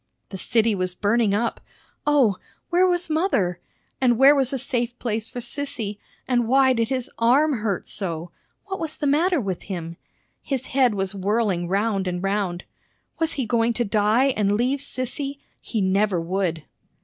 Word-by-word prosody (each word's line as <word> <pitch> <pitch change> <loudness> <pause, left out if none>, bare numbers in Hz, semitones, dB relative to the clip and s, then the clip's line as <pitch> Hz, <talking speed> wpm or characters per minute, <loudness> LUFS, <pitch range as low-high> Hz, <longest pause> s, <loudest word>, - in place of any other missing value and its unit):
The 190 - -6
city 225 +2 +2
was 185 -2 -2
burning 210 +1 +2
up! 230 +2 -1 0.5
O, 265 -10 +4 0.3
where 360 +2 +4
was 355 -1 0
mother? 310 - 0 0.4
And 245 -3 +4
where 270 +3 +8
was 270 -3 +1
a 270 - -1
safe 245 -2 -2
place 225 -2 -3
for 245 - -6
Sissy? 230 -7 -4 0.3
And 240 -3 +1
why 265 +1 +5
did 230 -2 0
his 260 -2 -2
arm 260 +3 +3
hurt 205 -3 -2
so? 170 -3 -4 0.3
What 385 -1 -5
was 320 -1 -4
the 295 - -3
matter 325 +5 +3
with 190 -7 -3
him? 170 -3 -6 0.4
His 265 -3 -3
head 255 -5 +3
was 195 0 -2
whirling 200 -2 0
round 195 0 0
and 180 0 -3
round. 195 -3 -1 0.6
Was 325 0 +1
he 265 - -2
going 230 0 +1
to 240 +1 0
die 215 +5 +3
and 205 -1 +1
leave 250 +6 +1
Sissy? 275 +1 -4 0.2
He 220 - -3
never 195 0 +2
would! 170 -2 -2
230 Hz, 170 wpm, -23 LUFS, 195-270 Hz, 0.6 s, where